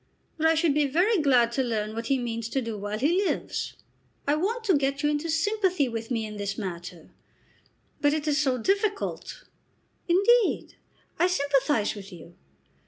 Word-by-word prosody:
"But 320 Hz, -, +3 dB
I 325 Hz, -, +4 dB
should 320 Hz, -2 st, +2 dB
be 295 Hz, 0 st, +2 dB
very 360 Hz, -, +2 dB
glad 250 Hz, -5 st, +4 dB
to 265 Hz, -, 0 dB
learn 215 Hz, -3 st, -2 dB
what 230 Hz, +1 st, -4 dB
he 275 Hz, -, +2 dB
means 230 Hz, -2 st, -4 dB
to 270 Hz, -, -1 dB
do 230 Hz, -1 st, -4 dB
while 205 Hz, +1 st, -4 dB
he 335 Hz, -, +2 dB
lives. -, -, -2 dB, 0.5 s
I 290 Hz, -, +3 dB
want 420 Hz, +10 st, -1 dB
to 405 Hz, -4 st, +3 dB
get 275 Hz, +1 st, 0 dB
you 295 Hz, -, +3 dB
into 300 Hz, +3 st, -2 dB
sympathy 365 Hz, -2 st, +1 dB
with 225 Hz, -1 st, -5 dB
me 230 Hz, -3 st, -1 dB
in 210 Hz, -1 st, -7 dB
this 200 Hz, -1 st, -3 dB
matter; 175 Hz, -4 st, -7 dB, 0.9 s
but 290 Hz, -, +4 dB
it 310 Hz, 0 st, -2 dB
is 300 Hz, 0 st, +2 dB
so 265 Hz, -3 st, +1 dB
difficult." 400 Hz, -, -1 dB, 0.6 s
"Indeed 400 Hz, +6 st, +3 dB, 0.5 s
I 355 Hz, -, +4 dB
sympathise 280 Hz, -, +1 dB
with 200 Hz, -1 st, -10 dB
you." 170 Hz, -1 st, -12 dB
280 Hz, 175 wpm, -26 LUFS, 225-340 Hz, 0.9 s, I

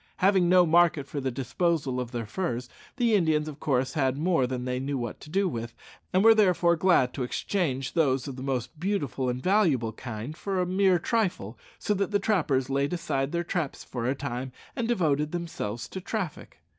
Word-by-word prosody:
Having 190 Hz, -2 st, +3 dB
no 180 Hz, -1 st, +6 dB
market 165 Hz, -3 st, +4 dB
for 140 Hz, 0 st, -5 dB
the 135 Hz, -, -1 dB
disposal 135 Hz, +1 st, -1 dB
of 125 Hz, -2 st, -3 dB
their 120 Hz, -2 st, -4 dB
furs, 125 Hz, -, -3 dB, 0.3 s
the 235 Hz, -3 st, +2 dB
Indians 160 Hz, -6 st, +2 dB
of 150 Hz, -1 st, -7 dB
course 130 Hz, -3 st, 0 dB
had 135 Hz, -3 st, +1 dB
more 160 Hz, -4 st, +2 dB
than 125 Hz, -1 st, -4 dB
they 125 Hz, 0 st, -1 dB
knew 140 Hz, +1 st, -2 dB
what 120 Hz, -3 st, -4 dB
to 150 Hz, -, -12 dB
do 195 Hz, +4 st, +1 dB
with, 115 Hz, -6 st, -5 dB, 0.4 s
and 185 Hz, +2 st, +3 dB
were 225 Hz, 0 st, +8 dB
therefore 180 Hz, -5 st, +3 dB
glad 165 Hz, -7 st, +3 dB
to 135 Hz, -, -5 dB
exchange 135 Hz, 0 st, -1 dB
those 135 Hz, -5 st, +1 dB
of 135 Hz, -, -5 dB
the 130 Hz, -, -8 dB
most 135 Hz, +3 st, -3 dB
beautiful 150 Hz, -9 st, -1 dB
and 125 Hz, +1 st, -3 dB
valuable 160 Hz, -, +2 dB
kind 120 Hz, +5 st, -6 dB
for 195 Hz, +2 st, -2 dB
a 180 Hz, -, +2 dB
mere 185 Hz, 0 st, +3 dB
trifle, 175 Hz, -, -1 dB, 0.2 s
so 210 Hz, -, 0 dB
that 200 Hz, -1 st, -1 dB
the 205 Hz, -, +2 dB
trappers 160 Hz, -, +1 dB
laid 140 Hz, +3 st, 0 dB
aside 135 Hz, -5 st, -1 dB
their 170 Hz, 0 st, -1 dB
traps 170 Hz, -4 st, -3 dB
for 120 Hz, -2 st, -4 dB
a 130 Hz, -, +1 dB
time 130 Hz, -1 st, -4 dB, 0.2 s
and 235 Hz, -, -1 dB
devoted 150 Hz, -9 st, +1 dB
themselves 120 Hz, -10 st, -4 dB
to 190 Hz, -, -6 dB
traffic. 180 Hz, -, -5 dB
150 Hz, 200 wpm, -27 LUFS, 130-180 Hz, 0.4 s, were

